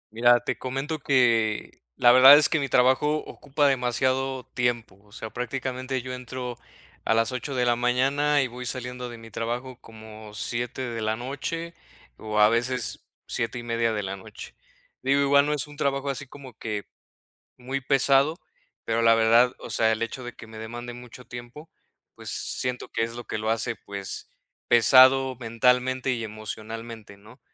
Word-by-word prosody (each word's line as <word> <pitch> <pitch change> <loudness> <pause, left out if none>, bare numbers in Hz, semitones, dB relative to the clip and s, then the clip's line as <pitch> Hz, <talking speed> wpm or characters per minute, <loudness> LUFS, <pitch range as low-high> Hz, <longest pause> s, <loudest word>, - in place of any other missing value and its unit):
Mira, 120 +1 +5
te - - -3
comento 135 +5 -3
que 115 -6 +2 0.2
la 120 0 +6
verdad 130 +3 +10
es 150 - +6
que 160 - 0
mi 140 -2 -2
trabajo 130 +5 +3
ocupa 145 +1 -1
demasiado 130 0 0
tiempo. 120 -5 -1
O 105 - -24
sea, 110 0 -8
prácticamente 130 +1 -4
yo 130 0 -6
entro 125 -1 -6 0.4
a 110 - +2
las 115 +2 +2
8 130 +2 -4
de 125 -1 +1
la 120 0 +3
mañana 135 +4 +2
y - - -1
voy 125 +1 -8
saliendo 125 -1 -5
de 120 - -9
mi 115 -1 -13
trabajo 120 +3 -4
como 110 -1 -12
7 120 +4 -3
de 115 -2 -4
la 110 0 0
noche 145 +7 -5 0.4
o 110 -1 -3
a 105 0 +7
veces 120 +1 -1 0.2
7 115 +2 -3
y 120 - -6
media 115 -1 0
de 105 -1 -2
la 95 0 -4
noche. 95 - -11 0.5
Digo, 135 +2 +2
igual 140 +1 +4
no 150 - +1
es 150 - -1
un 145 -1 -14
trabajo 140 0 -1
así 140 +1 -6
como 135 -2 -12
que 105 -2 -4 0.7
muy 130 +2 -4
pesado, 135 +3 +3 0.5
pero 115 0 0
la 115 0 +6
verdad, 115 +3 +4
o - - -9
sea, 110 +1 +2
el 110 - -5
hecho 120 +2 -4
de 120 - -7
que - - -12
me 110 0 -12
demande 120 +2 -7
mucho 125 +1 -11
tiempo, 120 +6 -10 0.5
pues - - -8
siento 125 -1 -2
que - - -1
es 115 0 -4
lo 120 - -7
que - - -4
lo 110 +1 -2
hace, 115 +1 -1
pues, 100 -1 -6 0.4
pesado 130 +2 +6
mentalmente 125 +2 +1
y 120 -2 -2
emocionalmente, 110 0 -8
¿no? 110 +6 -17
125 Hz, 180 wpm, -25 LUFS, 115-130 Hz, 0.7 s, verdad